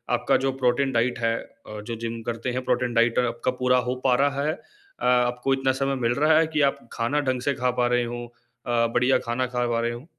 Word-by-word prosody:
आपका - - +2
जो 135 - +2
protein 130 +2 +2
diet 120 +1 0
है 115 -1 +1
अ, 105 -2 -11
जो 115 +2 -5
जिम 115 0 -5
करते 115 +1 -3
हैं 125 +1 -3
प्रोटीन 125 -1 0
डाइट 115 0 +3
आपका 120 0 0
पूरा 125 0 +3
हो 125 - -1
पा 130 -2 +4
रहा 140 0 0
है? 155 - +1
अ, 400 - -12
आपको 125 +1 +2
इतना 135 0 +1
समय 135 0 +1
मिल 120 - +2
रहा 155 +1 +5
है 165 - +2
कि 150 - +2
आप - - -18
खाना 125 +6 0
ढंग 130 -1 -1
से 140 +3 0
खा 125 0 0
पा 120 - +3
रहे 120 - +2
हों, 120 0 -5
अ, 120 0 -3
बढ़िया 125 +2 +3
खाना 120 +2 0
खा 125 0 -1
पा 115 -1 0
रहे 120 0 -1
हों? 120 +3 -8
125 Hz, 240 wpm, -24 LUFS, 120-130 Hz, -, रहा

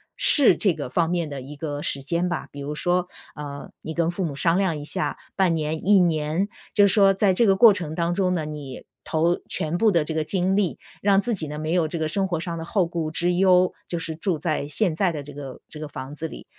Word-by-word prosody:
试 285 -5 +5
这 190 -6 +1
个 145 -5 -5
方 165 +5 +1
面 170 -2 -1
的 140 -2 -6
一 140 +3 -9
个 145 -1 -4
时 140 -3 -1
间 170 +5 0
吧。 175 - -3
比 145 - -10
如 145 +2 -4
说， 180 +3 0 0.3
呃， 145 -1 -8
你 160 - -6
跟 170 0 +1
父 185 +2 -3
母 155 -5 -3
商 165 +5 +2
量 185 -5 0
一 145 - -7
下， 185 +4 0 0.2
半 185 -4 +2
年、 155 +2 -3
1 205 -2 +6
年， 165 +3 +1 0.3
就 205 -2 +6
说 195 0 +5
在 195 0 +2
这 225 +5 +3
个 195 - +5
过 215 +2 +7
程 165 -5 -5
当 170 +1 0
中 185 0 +1
呢， 160 -3 -2
你 145 -4 -8 0.2
投 170 +2 +1
全 160 +1 -2
部 225 - +4
的 170 -5 +2
这 160 - -3
个 155 0 0
精 185 +3 +1
力， 195 -4 0 0.2
让 200 -1 +4
自 235 +4 -1
己 165 -7 -3
呢 150 +1 -6
没 155 +2 -2
有 170 -3 +2
这 170 - -4
个 160 -1 -1
生 190 +5 -1
活 175 -3 -2
上 170 0 -4
的 - - -5
后 180 +2 +1
顾 165 -2 -3
之 175 +3 0
忧， 180 0 +4
就 170 - -3
是 165 -1 -5
住 170 0 -1
在 155 -2 -2
现 165 +3 +2
在 180 +1 +1
的 150 -3 -5
这 145 +1 -11
个 135 -2 -8
这 150 - -10
个 155 - -5
房 135 -1 -8
子 160 +2 -4
里， - - -11
170 Hz, 270 characters per minute, -24 LUFS, 150-185 Hz, 0.3 s, 过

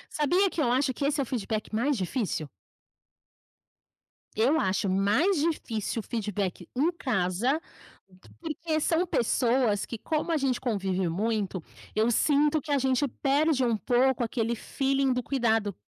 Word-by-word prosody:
Sabia 350 +6 +3
que 325 - -2
eu 240 -4 +2
acho 260 +1 +1
que 280 - -3
esse 290 +1 0
é - - +2
o - - -6
feedback 220 -3 -3
mais 250 +5 +1
difícil? 185 - -2 1.9
Eu 265 +9 +3
acho 190 +1 0
mais 210 - +2
difícil 235 - -2
feedback 205 -4 -3
em 300 +7 +2
casa, 245 - 0 0.8
porque 320 -1 -2
são 330 +3 +1
pessoas 235 -5 +1
que 230 - -6
como 320 +1 -2
a 320 - +2
gente 270 -3 0
convive 190 -6 -1
muito, 200 -1 -2 0.3
eu 220 +2 +3
sinto 295 +4 +3
que 295 - -6
a 285 - +3
gente 265 +2 +1
perde 275 +2 +1
um 230 -2 +1
pouco 245 +4 +2
aquele 230 0 -1
felling 270 +2 0
do 250 - -1
cuidado, 225 -6 0
250 Hz, 145 wpm, -27 LUFS, 215-290 Hz, 1.9 s, Sabia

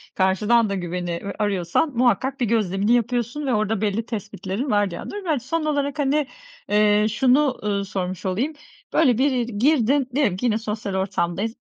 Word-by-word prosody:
karşıdan 210 +4 +3
da 200 - -1
güveni, 175 -1 -3
ııı, 200 - -4
arıyorsan 205 - 0
muhakkak 255 +3 +2
bir 245 - +1
gözlemini 205 -1 +1
yapıyorsun 245 +4 0
ve 260 - 0
orada 215 -1 0
belli 215 +2 -1
tespitlerin 210 +2 -4
var 205 -1 +3
bir 170 - -5
yandan. 405 - -7
Ben 310 -5 +1
son 310 +6 -2
olarak 285 -1 -1
hani, 290 0 +1 0.4
eee, 210 0 +4
şunu, 260 +4 +2
ııı, 200 -1 -1
sormuş 185 -1 -4
olayım, 225 +12 -1 0.4
böyle 260 -8 +4
bir 275 +2 +3
yeri 240 -4 -2
girdin, 270 0 +2
diyelim 235 -11 +2
ki 245 - -3
yine 220 -2 +2
sosyal 210 -3 -4
ortamdayız. 190 +2 -1
220 Hz, 175 wpm, -23 LUFS, 200-265 Hz, 0.4 s, eee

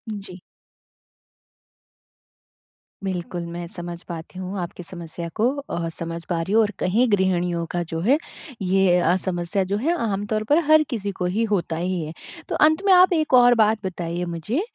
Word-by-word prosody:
जी। 195 -2 -9 2.6
बिल्कुल, 180 -2 -3
मैं 170 +1 -6
समझ 175 0 -7
पाती 170 +2 -7
हूँ 185 +2 -5
आपकी 175 0 -6
समस्या 170 -1 -7
को 225 - +2 0.2
अ, 170 -1 -2
समझ 170 0 -5
पा 170 -2 0
रही 190 +5 -3
हूँ। 225 - +6
और 210 -2 +1
कहीं 225 +8 +2
गृहिणियों 180 -3 +1
का 175 - -1
जो 165 - -2
है 255 - +4 0.4
ये 190 -1 +3
अ, 175 0 +3
समस्या 180 +1 0
जो 195 +2 -1
है 310 +11 +1
आमतौर 210 +1 -1
पर 295 - +5
हर 310 0 +7
किसी 205 -6 -3
को 180 - 0
ही 200 +6 0
होता 170 -5 0
ही 180 +1 -1
है। 155 +1 -6 0.4
तो - - -1
अंत 315 +4 +4
में 395 - +5
आप 365 0 +6
एक 310 -4 0
और 245 -1 +7
बात 215 -2 +2
बताइए 175 -1 -3
मुझे, 170 - -2
185 Hz, 175 wpm, -23 LUFS, 175-215 Hz, 2.6 s, हर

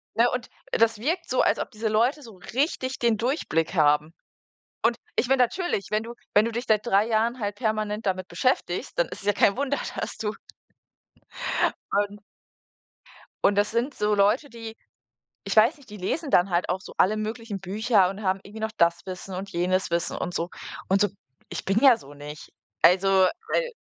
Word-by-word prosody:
ne? 235 +2 +4
Und 250 -1 -3 0.2
das 225 -1 +3
wirkt 335 +8 -2
so, 255 - +2
als - - +3
ob - - -4
diese 220 +1 -3
Leute 240 +8 +2
so 225 -6 -12 0.2
richtig 260 -1 -1
den 235 -2 +3
Durchblick 210 - -1
haben. 150 0 +3 0.7
Und 230 0 +3 0.2
ich 250 - +1
mein, 270 0 +3
natürlich 250 - 0
wenn 215 +1 +1
du 235 +1 -8 0.2
wenn 210 +1 +6
du - - -1
dich 235 +2 -3
seit 215 0 +2
3 210 -2 +3
Jahren 230 +2 +1
halt 205 -2 -2
permanent 215 -2 -2
damit 185 -1 -1
beschäftigst, 230 -8 -1
dann 170 - +3
ist - - -8
es 200 - -11
ja 205 - +4
kein 200 - +3
Wunder, 280 +1 0 0.2
dass - - -4
du 210 -1 -2 1.6
Und 205 0 0 1.2
und 200 - +4
das 205 +1 +2
sind 240 +5 0
so 210 0 +1
Leute, 215 +9 +2
die 225 -1 -8 0.7
ich - - -2
weiß 230 +9 +6
nicht, 275 -7 -19
die 210 - -8
lesen 275 - -3
dann 180 +2 +4
halt 175 0 +1
auch 185 +2 -1
so - - -11
alle 215 +4 +4
möglichen 215 -2 -4
Bücher 195 0 +2
und 195 +2 -8
haben 190 +1 +1
irgendwie 215 +2 -10
noch 220 - -2
das 170 0 +3
Wissen 185 +1 -7
und 195 +2 -5
jenes 180 +1 0
Wissen 170 0 0
und 175 - -4
so. 170 +1 -1 0.4
Und 195 +1 +3
so 205 - +4 0.4
ich - - -5
bin 195 +3 +2
ja 265 -3 +7
so 145 -10 -14
nicht. 145 0 -10 0.3
Also, 185 +3 +5 0.4
weil - - +1
215 Hz, 195 wpm, -25 LUFS, 190-235 Hz, 1.6 s, ja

